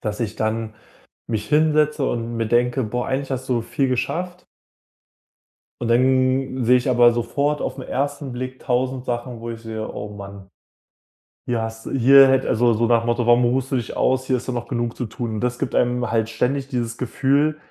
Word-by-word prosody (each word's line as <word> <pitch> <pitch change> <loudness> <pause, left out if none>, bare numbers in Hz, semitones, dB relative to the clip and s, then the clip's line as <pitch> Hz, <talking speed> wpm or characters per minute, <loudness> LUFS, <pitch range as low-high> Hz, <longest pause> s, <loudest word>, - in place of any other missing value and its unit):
dass 105 0 -4
ich 110 -2 -3
dann 110 0 -2 0.5
mich 105 -2 -3
hinsetze 150 -2 +2
und 115 0 -3
mir 115 -1 -1
denke: 120 +2 +1
„Boah, 120 +3 -3
eigentlich 135 +1 -2
hast 130 0 -4
du 120 -3 +1
viel 135 +3 -1
geschafft.“ 175 +8 -3 1.4
Und 120 - -1
dann 130 +1 +2
sehe 125 +2 +5
ich 125 +1 -2
aber 120 -1 +6
sofort 140 +5 -1
auf - - -3
'n - - -6
1. 140 0 -3
Blick 130 +1 -6
1.000 130 +1 -1
Sachen, 120 -1 -4
wo 115 0 -6
ich 115 -1 -7
sehe: 110 -1 -5
„Oh 105 - -6
Mann. 100 -1 -10 1.0
Hier 120 -2 0
hast 110 0 -6
du - - -5
hier 135 +1 +7
hätte“ 135 0 +2
also, 120 0 +3
so 115 +2 +1
nach 115 0 +3
dem - - -5
Motto: 120 0 +1
„Warum 120 +1 +5
ruhst 130 +2 0
du - - +1
dich 120 -4 -3
aus? 130 0 +1
Hier 130 -1 +1
ist 125 - -8
doch 130 - -2
noch 120 -1 -4
genug 120 -2 -2
zu 125 - -3
tun.“ 110 0 -5
Und 105 - -3
das 125 0 -1
gibt - - -3
einem 125 0 +1
halt 115 -1 +1
ständig 130 +4 -1
dieses 120 -3 -3
Gefühl, 140 +4 +1
125 Hz, 205 wpm, -22 LUFS, 115-130 Hz, 1.4 s, hier